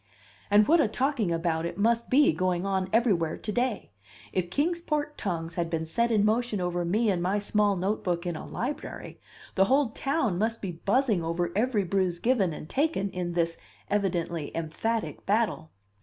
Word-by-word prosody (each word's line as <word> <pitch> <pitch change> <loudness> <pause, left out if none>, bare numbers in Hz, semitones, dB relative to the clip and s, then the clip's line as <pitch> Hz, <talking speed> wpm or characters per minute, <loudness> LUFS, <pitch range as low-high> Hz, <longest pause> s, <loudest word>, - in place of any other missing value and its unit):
And 205 +1 +5
what 335 +2 +5
a 245 - +3
talking 250 -5 0
about 165 -1 0
it 170 - -4
must 230 +3 +1
be 280 - +5
going 180 +2 0
on 190 -1 0
everywhere 200 -9 +2
to 215 - -5
day! 240 - -1 0.4
If 180 -2 -1
Kings 335 - 0
Port 300 -2 -2
tongues 165 -4 -3
had 170 -2 -2
been 165 -1 -2
set 235 +9 0
in 210 -3 +3
motion 225 -1 +1
over 175 -1 -1
me 210 +6 +2
and 180 -2 -1
my 185 +4 +1
small 205 0 +1
notebook 180 -2 -1
in 175 -2 -2
a - - -6
library, 265 +5 -5 0.3
the 195 - +4
whole 265 +2 +2
town 270 - -1
must 225 +2 0
be 195 - -4
buzzing 205 +2 +1
over 170 +1 -1
every 220 -1 +2
bruise 185 -1 0
given 215 -4 +2
and 155 - -7
taken 270 - 0
in 175 -1 -3
this 170 -1 0 0.3
evidently 170 -6 -1
emphatic 210 +8 -2
battle. 205 -6 +1
200 Hz, 180 wpm, -28 LUFS, 175-235 Hz, 0.4 s, And